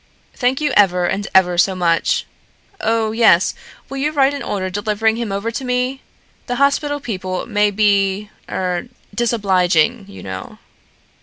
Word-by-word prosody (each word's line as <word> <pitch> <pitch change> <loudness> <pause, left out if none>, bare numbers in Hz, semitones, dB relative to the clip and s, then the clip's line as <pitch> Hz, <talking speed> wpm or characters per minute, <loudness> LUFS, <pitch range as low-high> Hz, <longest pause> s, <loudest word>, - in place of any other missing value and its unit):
Thank 255 +1 0
you 295 - +1
ever 180 -3 +4
and 195 +3 -2
ever 180 -2 +4
so 190 +1 +3
much. 170 -2 +1 0.5
Oh, 225 -8 0
yes; 220 -6 +4 0.3
will 275 - -7
you 290 +3 0
write 280 -2 +3
an 285 - -5
order 185 -2 -3
delivering 215 +3 0
him 235 -3 -3
over 200 +4 -2
to 250 - -5
me? 250 +1 -1 0.5
The 245 - -2
hospital 280 +2 +1
people 185 -8 -4
may 210 -2 +2
be 205 0 +1 0.2
er 180 +3 -2 0.3
disobliging, 200 -3 +1
you 200 - -11
know." 95 -1 -7
210 Hz, 150 wpm, -18 LUFS, 185-245 Hz, 0.5 s, ever